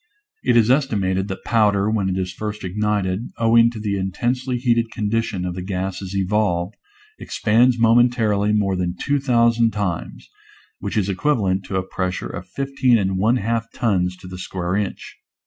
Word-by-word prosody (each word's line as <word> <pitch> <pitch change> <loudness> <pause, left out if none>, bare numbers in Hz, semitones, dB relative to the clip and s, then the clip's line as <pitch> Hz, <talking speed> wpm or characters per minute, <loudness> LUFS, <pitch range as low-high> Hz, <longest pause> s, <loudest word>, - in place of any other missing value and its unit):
It 120 - +3
is 115 +1 +4
esti 135 -3 +2
mated 95 -1 0
that 95 -2 -6
powder, 105 -3 +2
when 105 -3 0
it 95 - -1
is 90 -1 -3
first 105 +2 -5
ignited, 100 +1 -1
owing 115 0 +5
to 115 -2 -8
the 105 -2 -2
intensely 125 +7 -1
heated 120 -2 +1
condition 105 -3 -2
of 90 - -3
the 90 - -5
gases 95 0 -4
evolved, 95 -1 0 0.4
expands 120 +3 +2
momentarily 115 -3 +3
more 100 -3 +1
than 90 -1 -2
2,000 120 -5 +2
times 100 -6 -4 0.3
— - - -31
which - - -4
is 100 -3 +1
equivalent 100 -4 0
to 95 - -5
a 95 0 -1
pressure 95 -1 -3
of - - -7
fifteen 135 -3 +1
and 95 -2 -1
one 110 +5 +3
half 115 0 -2
tons 90 -6 0
to 90 0 -12
the 90 0 -8
square 90 0 -3
inch. 100 -1 -4
105 Hz, 170 wpm, -21 LUFS, 95-115 Hz, 0.4 s, owing